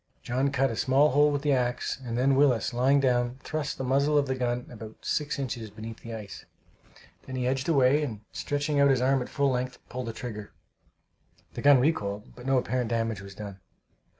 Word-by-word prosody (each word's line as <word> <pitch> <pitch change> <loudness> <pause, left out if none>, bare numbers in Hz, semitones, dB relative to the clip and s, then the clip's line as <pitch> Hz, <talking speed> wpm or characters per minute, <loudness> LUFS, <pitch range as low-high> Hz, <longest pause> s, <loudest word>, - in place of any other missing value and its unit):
John 130 +3 0
cut 135 -1 +1
a - - -4
small 135 +6 +3
hole 145 +2 +5
with 145 0 -2
the 145 - +2
axe, 125 0 -1
and 120 -1 -3
then 135 +2 +3
Willis, 130 -4 +3
lying 130 +4 +3
down, 125 -2 +1
thrust 155 -2 -3
the - - -4
muzzle 140 +3 +2
of 145 - +3
the 130 - -1
gun 125 -1 -2
about 110 -2 -11
six 150 0 -1
inches 120 -5 -4
beneath 110 +2 -9
the 115 -1 -7
ice. 105 -3 -9 0.8
Then 130 - -5
he 125 -1 -1
edged 130 +3 -1
away, 140 -1 +4
and 115 -8 -4
stretching 145 0 -1
out 140 0 +5
his 135 -2 +3
arm 135 +1 +2
at 125 - -5
full 140 -1 +1
length, 125 0 -2
pulled 125 -1 -5
the 115 - -4
trigger. 105 -4 -7 1.0
The - - -5
gun 140 -2 +7
recoiled, 105 -8 -1
but 125 +1 -10
no 135 -1 +3
apparent 125 -2 -1
damage 115 -3 -1
was 100 0 -11
done. 100 -2 -8
130 Hz, 205 wpm, -27 LUFS, 115-140 Hz, 1.0 s, gun